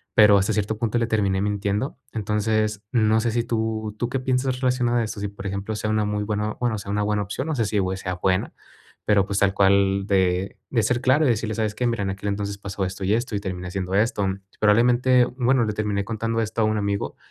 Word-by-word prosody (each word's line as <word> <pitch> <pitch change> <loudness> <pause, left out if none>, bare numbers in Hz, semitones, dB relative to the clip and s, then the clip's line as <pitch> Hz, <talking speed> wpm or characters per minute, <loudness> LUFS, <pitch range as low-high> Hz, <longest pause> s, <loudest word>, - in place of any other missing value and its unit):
Pero, 105 -2 +7
hasta 100 +3 +1
cierto 105 +1 -1
punto, 115 +1 -1
le 115 - 0
terminé 100 -4 +1
mintiendo. 105 +5 -1
Entonces, 105 0 -1
no 110 -2 +3
sé 115 0 0
si 120 +1 0
tú 110 -2 -2
tú 120 - -1
qué 135 - -1
piensas 130 0 0
relacionado 125 -2 +1
a - - +1
esto, 110 -1 -5
si 100 - -1
por 100 0 -11
ejemplo 100 +3 -3
sea 105 - -2
una 110 0 +1
muy 105 0 -1
buena 105 0 -2
bueno, 120 -3 0
sea 100 0 -6
una 105 0 0
buena 105 0 0
opción, 105 +8 -4
no 160 - -1
sé 120 - +1
si 105 0 0
u 95 -1 0
eh, - - -4
sea 90 -1 -4
buena. 95 +1 0 0.5
Pero, 100 -2 +3
pues, 100 0 -1
tal 100 -1 +3
cual, 100 0 +3
de 95 -1 +1
de 115 -4 +2
ser 120 +3 +1
claro 130 +4 +3
y - - +3
decirle: 110 -2 -1
"¿Sabes 110 -2 -1
qué?, 125 +2 0
mira, 115 -3 -1
en 95 - -1
aquel 95 +1 -6
entonces 100 0 -3
pasó 100 0 -4
esto 95 +1 -5
y 100 - +2
esto, 120 +1 -3
y - - 0
terminé 90 -2 -5
haciendo 95 0 -4
esto". 105 -1 +1 0.3
Probablemente, 120 +4 +4
bueno, 125 0 +1
le 105 - -2
terminé 105 -1 -1
contando 115 +1 -2
esto 110 +1 -2
a - - +4
un 110 0 +1
amigo, 100 -1 -2
105 Hz, 245 wpm, -23 LUFS, 100-115 Hz, 0.5 s, Pero